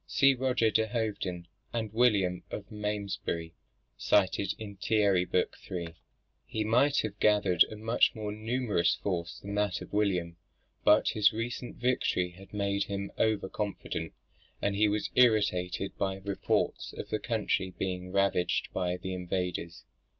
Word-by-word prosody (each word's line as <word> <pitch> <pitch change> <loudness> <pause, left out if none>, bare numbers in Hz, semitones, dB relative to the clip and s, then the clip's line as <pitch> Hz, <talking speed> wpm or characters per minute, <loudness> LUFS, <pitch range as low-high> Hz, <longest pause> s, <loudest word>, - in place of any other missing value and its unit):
[See 140 0 +5
Roger 125 -3 +1
de 110 +1 +2
Hoveden 105 -7 -2 0.3
and 110 -3 -3
William 100 -7 +3
of 100 -1 -7
Malmesbury, 100 -6 -3 0.5
cited 100 0 +2
in 100 -2 -8
Thierry, 100 -3 +2
book 90 - 0
iii.] 85 -3 -4 0.5
He 110 - -3
might 125 +6 +3
have 105 -1 -5
gathered 105 -5 +5
a - - -9
much 110 +3 +2
more 105 -1 -4
numerous 110 -3 0
force 85 -4 -3
than 100 +1 -6
that 105 -3 0
of - - -11
William, 90 -5 0 0.5
but - - +5
his 105 -2 +4
recent 120 +2 -4
victory 120 -7 0
had 95 +2 -15
made, 100 -1 0
him 100 0 -4
over 110 -3 +2
confident, 105 +1 -4 0.5
and 100 0 0
he 105 +1 +4
was 105 +1 -1
irritated 100 -6 +2
by 95 -1 0
the 95 +1 -15
reports 100 - -1
of - - -7
the 110 - -1
country 105 -5 -1
being 90 -1 -3
ravaged 100 -2 +1
by 90 -1 -1
the 95 +1 -5
invaders. 90 -2 -3
100 Hz, 150 wpm, -30 LUFS, 90-110 Hz, 0.5 s, See